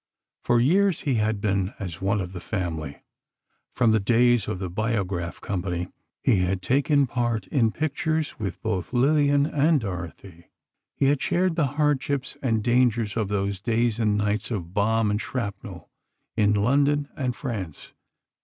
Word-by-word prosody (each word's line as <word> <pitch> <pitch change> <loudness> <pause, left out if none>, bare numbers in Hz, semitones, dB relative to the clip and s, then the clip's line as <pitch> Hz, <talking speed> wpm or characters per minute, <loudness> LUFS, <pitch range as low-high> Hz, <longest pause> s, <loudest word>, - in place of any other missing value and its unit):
For 120 -1 +2
years, 185 +9 +3
he 140 - 0
had 105 -1 0
been 100 -2 -1
as 90 -5 -6
one 100 +1 +1
of 95 0 -6
the 90 - -6
family. 85 -7 -4 0.7
From 115 -3 +3
the 110 - +3
days 120 +1 +3
of - - -2
the 95 0 -4
Biograph 95 -3 -2
company, 90 -2 -3 0.3
he 105 - +4
had 90 +1 -1
taken 140 - +3
part 120 -3 -1
in 115 -6 +2
pictures 155 +2 -2
with 100 -4 -4
both 105 0 -2
Lillian 145 +2 +3
and 150 0 +2
Dorothy; 90 -3 -7 0.5
he - - +1
had 140 0 +2
shared 180 -1 +1
the 160 -4 +2
hardships 145 -2 0
and 115 -5 0
dangers 120 -3 +2
of 110 -3 0
those 100 -1 -2
days 115 0 0
and 105 -2 +2
nights 105 +1 -1
of 90 -7 -4
bomb 110 +1 +2
and 105 +2 -1
shrapnel, 115 -6 -5 0.4
in 105 -1 +3
London 140 +7 +2
and 125 -3 -2
France. 100 - -6
110 Hz, 155 wpm, -25 LUFS, 100-135 Hz, 0.7 s, he